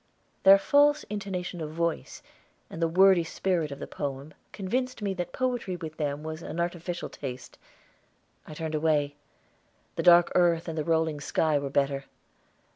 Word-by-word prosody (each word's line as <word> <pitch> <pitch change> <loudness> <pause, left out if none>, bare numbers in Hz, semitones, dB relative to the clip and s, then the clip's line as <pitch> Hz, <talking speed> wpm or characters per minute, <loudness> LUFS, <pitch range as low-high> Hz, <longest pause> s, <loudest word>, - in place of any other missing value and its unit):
Their 195 +1 +8
false 290 +7 +3
intonation 185 -4 -4
of 155 - -4
voice 170 0 -3 0.5
and 165 - -7
the 165 - +3
wordy 185 +1 +5
spirit 170 -1 -1
of 140 - -6
the - - -6
poem 140 +1 -6 0.2
convinced 245 +4 -3
me 200 -1 0
that 175 -1 -4
poetry 245 -7 -2
with 160 -2 -8
them 145 -1 -2
was 160 +1 -6
an 170 - -6
artificial 175 0 -3
taste. 130 -3 -8 0.9
I 155 - -9
turned 160 0 -4
away. 150 -2 +1 0.8
The - - +1
dark 175 0 +6
earth 170 -2 +2
and 165 - -4
the 155 - -1
rolling 160 -2 0
sky 155 +1 +1
were 140 -1 -4
better. 140 0 0
165 Hz, 160 wpm, -27 LUFS, 155-185 Hz, 0.9 s, Their